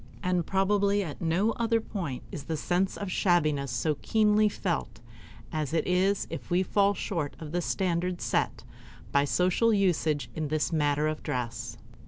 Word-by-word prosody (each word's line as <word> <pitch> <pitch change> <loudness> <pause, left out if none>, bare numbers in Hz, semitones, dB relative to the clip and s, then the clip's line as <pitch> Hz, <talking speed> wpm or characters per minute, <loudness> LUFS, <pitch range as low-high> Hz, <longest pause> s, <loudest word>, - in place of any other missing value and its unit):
And 180 -2 0
probably 200 +1 +2
at 150 -6 -7
no 175 +7 +2
other 230 -1 +2
point 175 - -5
is 145 - -6
the 160 - -2
sense 180 +5 0
of 200 -2 -4
shabbiness 155 -7 +2
so 135 +5 -1
keenly 215 -1 +3
felt 165 - -3 0.5
as 155 0 -2
it 160 - +1
is 190 +2 +2
if - - -6
we 180 +1 +3
fall 200 +2 +2
short 165 -9 -3
of 155 -2 -8
the 175 +1 0
standard 180 0 -1
set - - -1 0.5
by 140 0 +3
social 185 +9 +2
usage 170 -7 +1
in 155 -1 -3
this 155 +3 0
matter 150 -1 +2
of 155 0 -3
dress. 120 -2 -4
175 Hz, 165 wpm, -28 LUFS, 150-195 Hz, 0.5 s, keenly